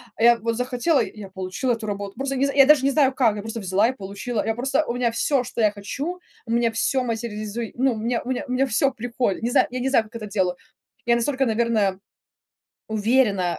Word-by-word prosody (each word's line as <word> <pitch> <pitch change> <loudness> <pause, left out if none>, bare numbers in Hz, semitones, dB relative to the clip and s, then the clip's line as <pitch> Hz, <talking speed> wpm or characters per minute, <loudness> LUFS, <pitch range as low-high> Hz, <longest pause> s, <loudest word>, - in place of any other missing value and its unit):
а 225 - -3
я 235 0 +7
вот 230 +1 -1
захотела- 250 +4 +1
и 215 - -9
я 195 - -8
получила 190 +7 -2
эту 225 -1 -5
работу. 200 -1 -5
Просто 275 +1 -2
не 270 - +2
з 275 - -3
я 275 -1 +8
даже 295 -1 +5
не 275 - +3
знаю 270 -2 +3
как, 235 -5 +2
я 205 - -5
просто 225 +2 -5
взяла 195 +2 +2
и - - -2
получила. 205 +3 -4
Я 225 - 0
просто 270 +5 0
у 235 - -1
меня 245 -1 +1
всё, 255 +3 +1
что 240 - -4
я 210 -1 +4
хочу, 275 - -5 0.3
у - - -4
меня 235 0 +2
всё 255 +3 0
материализуй 225 -1 -4
ну, 260 -1 +2
мне 230 +2 -1
мне 260 +3 -2
мне 255 +1 +1
всё 270 +2 +1
приходит, 240 -4 -2
не 235 - 0
знаю - - +4
я 255 - -4
не 260 +2 0
знаю, 230 -5 +3
как 220 +2 -17
это 225 -2 -5
делаю, 190 -3 0 0.5
я 235 0 +4
настолько, 265 +3 0
наверное, 220 -4 +1 0.9
уверена. 210 -4 +1
235 Hz, 230 wpm, -23 LUFS, 215-260 Hz, 0.9 s, я